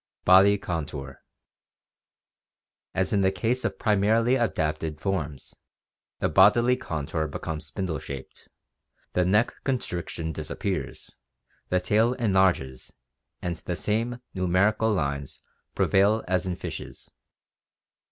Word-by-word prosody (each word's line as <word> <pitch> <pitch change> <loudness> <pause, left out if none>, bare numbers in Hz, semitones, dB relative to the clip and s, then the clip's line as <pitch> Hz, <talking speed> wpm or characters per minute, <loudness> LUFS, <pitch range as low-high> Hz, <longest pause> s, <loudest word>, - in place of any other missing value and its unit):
Body 95 +2 +7
Contour. 75 -7 -5 0.8
— - - -68
As 95 +2 0
in 100 - +3
the 95 0 +3
case 120 +5 -1
of 100 -4 -2
primarily 110 +4 +2
adapted 80 - -1
forms, 80 -8 -3 0.6
the - - 0
bodily 105 +9 +5
contour 80 - -3
becomes 75 +1 -5
spindle 85 -2 -3
shaped, 70 0 -9 0.7
the 90 - +2
neck 105 +6 +3
constriction 90 - -3
dis 75 - -6
appears, 90 -9 -4 0.6
the 90 - +2
tail 110 +6 +2
enlarges, 95 - +1 0.5
and 85 -1 -2
the 90 +2 -4
same 115 +6 -1
"numerical 100 +4 +2
lines" 70 -7 -2 0.4
prevail 105 +3 +3
as 95 +1 0
in 90 - -1
fishes. - - -8
95 Hz, 115 wpm, -26 LUFS, 80-105 Hz, 0.8 s, Body